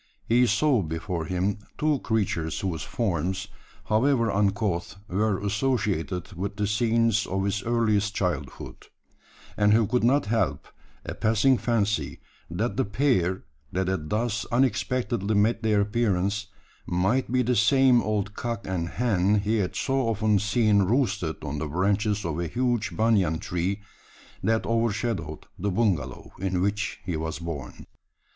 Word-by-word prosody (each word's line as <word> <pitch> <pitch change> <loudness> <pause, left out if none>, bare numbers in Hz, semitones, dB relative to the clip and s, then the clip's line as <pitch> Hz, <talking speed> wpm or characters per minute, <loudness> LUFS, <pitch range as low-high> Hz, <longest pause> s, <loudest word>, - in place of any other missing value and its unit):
He 120 +2 +4
saw 140 -3 +3
before 80 +1 -3
him 95 +4 -1 0.2
two 150 -2 +1
creatures 95 -10 -1
whose 85 -5 -2
forms, 95 -3 -2 0.4
however 115 0 +2
uncouth, 100 -3 0
were 105 +2 +1
associated 100 -4 -1
with 100 +3 -4
the 105 - -1
scenes 115 +1 +2
of 95 +1 -1
his 100 +1 -1
earliest 110 -3 +1
childhood; 90 -7 -4 0.7
and 105 0 +4
he 115 -1 +4
could 125 +3 0
not 135 +5 +3
help 110 +2 -1 0.4
a - - -4
passing 115 +4 +2
fancy, 105 - 0 0.3
that 110 +10 -2
the 135 - +3
pair, 100 -5 +1 0.3
that 95 0 -1
had 90 -5 -2
thus 110 0 -1
unexpectedly 120 -4 0
made 110 +3 +2
their 105 -2 +2
appearance, 105 -1 0 0.4
might 95 +9 +1
be 130 0 +2
the 125 +1 +1
same 125 +3 +5
old 105 -1 -1
cock 115 +1 -4
and 85 -3 -2
hen 105 -4 +1
he 110 +2 0
had 95 -4 -1
so 135 -2 0
often 110 -2 +2
seen 105 -1 +3
roosted 105 - 0
on 75 -1 -4
the 80 - -3
branches 100 +5 0
of 80 -1 -2
a 85 - -1
huge 120 0 -1
banyan 105 -8 +2
tree, 90 +5 -2 0.6
that 110 0 +1
overshadowed 110 -8 -1
the 100 +3 -1
bungalow 90 - -1
in 95 -1 -1
which 100 +3 -1
he 90 - -2
was 80 0 -3
born. 80 -6 -7
105 Hz, 145 wpm, -26 LUFS, 95-115 Hz, 0.7 s, same